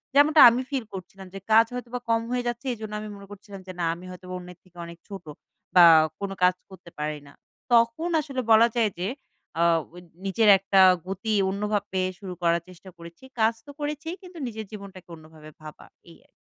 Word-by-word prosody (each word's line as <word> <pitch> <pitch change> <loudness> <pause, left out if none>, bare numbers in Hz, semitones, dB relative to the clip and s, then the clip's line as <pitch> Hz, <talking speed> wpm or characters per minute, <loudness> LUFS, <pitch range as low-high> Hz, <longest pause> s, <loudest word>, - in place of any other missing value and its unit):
যেমনটা 295 +2 +6
আমি 240 +2 -1
feel 270 -4 -2
করছিলাম 190 0 -10
যে 195 - -7
কাজ 225 +1 +7
হয়তো 245 -1 -6
বা 250 - -2
কম 230 0 +2
হয়ে 250 -1 -2
যাচ্ছে 240 +2 -4
এজন্য 215 -2 -8
আমি 215 - -7
মনে 200 0 -12
করছিলাম 200 0 -11
যে, - - -6
"না 170 - 0
আমি 180 +2 -13
হয়তো 180 0 -12
অন্যের 180 -1 -11
থেকে 180 -1 -24
অনেক 170 0 -11
ছোট 195 -3 -9 0.5
বা 175 - +9 0.4
কোন 200 - -4
কাজ 180 0 +4
করতে 185 -2 -14
পারি 150 0 -3
না!" 140 - -16 0.4
তখন 235 +8 +3
আসলে 270 -3 -4
বলা 225 +1 +7
যায় 220 -3 +2
যে 185 - -2 0.5
আ - - +4 0.3
ওই 175 - -11 0.2
নিজের 210 +2 +2
একটা 195 0 +1 0.3
গতি 195 +3 -3 0.2
অন্যভাবে 205 -1 -2 0.2
শুরু 190 -3 -7
করার 170 0 +2
চেষ্টা 185 +1 -14
করেছি। 170 +5 -13 0.2
কাজ 220 +1 +3
তো 290 - -11
করেছি 300 +2 -4
কিন্তু 365 -2 -13
নিজের 220 -1 -7
জীবনটাকে 195 -4 -11
অন্যভাবে 155 -1 -15
ভাবা। 155 -1 -12 0.2
এই - - -16
আর - - -43
200 Hz, 195 wpm, -25 LUFS, 180-230 Hz, 0.5 s, বা